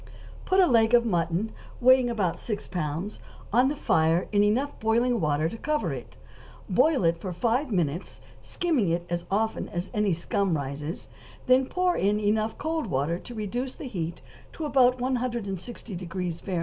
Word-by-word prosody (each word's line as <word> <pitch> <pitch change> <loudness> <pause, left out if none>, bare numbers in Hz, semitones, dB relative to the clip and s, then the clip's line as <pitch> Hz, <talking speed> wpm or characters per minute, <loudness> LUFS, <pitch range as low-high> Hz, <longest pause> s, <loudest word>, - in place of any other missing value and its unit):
= - - -17
Put 380 0 +3
a 375 - +7
leg 230 -5 +4
of 235 0 +4
mutton, 175 +1 0 0.3
weighing 255 0 +5
about 205 -7 -1
six 210 -3 -4
pounds, 175 +3 -3 0.3
on 250 +3 +5
the 290 - -1
fire 165 - +2
in 205 -1 +4
enough 245 +8 0
boiling 230 +3 +2
hot 235 -4 0
water 150 0 +1
to 225 - -7
cover 300 +5 -1
it; - - -9 0.5
boil 310 - +3
it 165 0 +2
for 185 - -5
five 235 - 0
minutes, 170 -2 -1 0.2
skimming 305 - 0
it 170 +1 -1
as 175 0 -2
often 220 +3 -1
as 175 +2 -4
any 210 -4 +2
scum 175 +1 0
rises, 145 +4 -5 0.4
then 255 +1 +4
pour 365 +2 +1
in 205 +2 +1
enough 215 +1 0
cold 315 -3 -2
water 150 +3 -1
to 240 - -10
reduce 240 +5 -3
the - - -8
heat 170 -7 -4 0.3
to 320 - -5
about 255 -3 +4
160° 195 -8 -3
Fahr. 185 -3 -2
210 Hz, 175 wpm, -27 LUFS, 175-250 Hz, 0.5 s, a